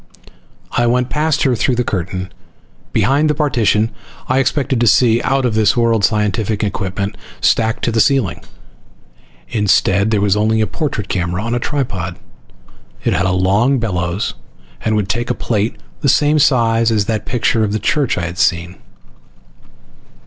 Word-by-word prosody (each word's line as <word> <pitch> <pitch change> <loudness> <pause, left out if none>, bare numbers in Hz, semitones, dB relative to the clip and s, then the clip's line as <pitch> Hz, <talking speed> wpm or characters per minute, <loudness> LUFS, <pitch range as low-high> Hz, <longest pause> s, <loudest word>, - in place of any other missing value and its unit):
I 120 0 +1
went 125 +1 0
past 155 0 +1
her 130 -3 +2
through 125 +3 0
the 125 - 0
curtain. 95 -2 -4 0.6
Behind 145 +3 +2
the 150 - +1
partition 115 -7 +1 0.4
I 130 +1 +2
expected 135 -2 0
to 120 - +3
see 120 0 +4
out 135 -1 0
of 120 - 0
this 110 0 +2
world 115 -3 +2
scientific 105 +1 0
equipment 100 0 -3 0.2
stacked 110 -1 +1
to 120 - +1
the 115 0 +2
ceiling. 125 - +1 1.1
Instead, 100 -1 +2
there 110 -2 +1
was 100 -1 +2
only 110 +1 +1
a 110 - +2
portrait 120 - -3
camera 90 +1 -2
on 115 +1 -2
a 120 - 0
tripod. 100 - -3 0.9
It - - +1
had 90 +2 +1
a - - +1
long 100 +9 +2
bellows 90 -5 -2 0.5
and 110 -1 0
would 105 -3 0
take 120 +5 -2
a - - 0
plate 110 -1 -1 0.2
the - - +1
same 150 +1 +3
size 115 -4 +3
as 105 -3 +1
that 110 -1 -3
picture 115 -1 +1
of 105 - -1
the 110 - 0
church 135 +4 0
I 90 - -1
had 85 +3 -6
seen. 85 -3 0
110 Hz, 165 wpm, -17 LUFS, 100-125 Hz, 1.1 s, see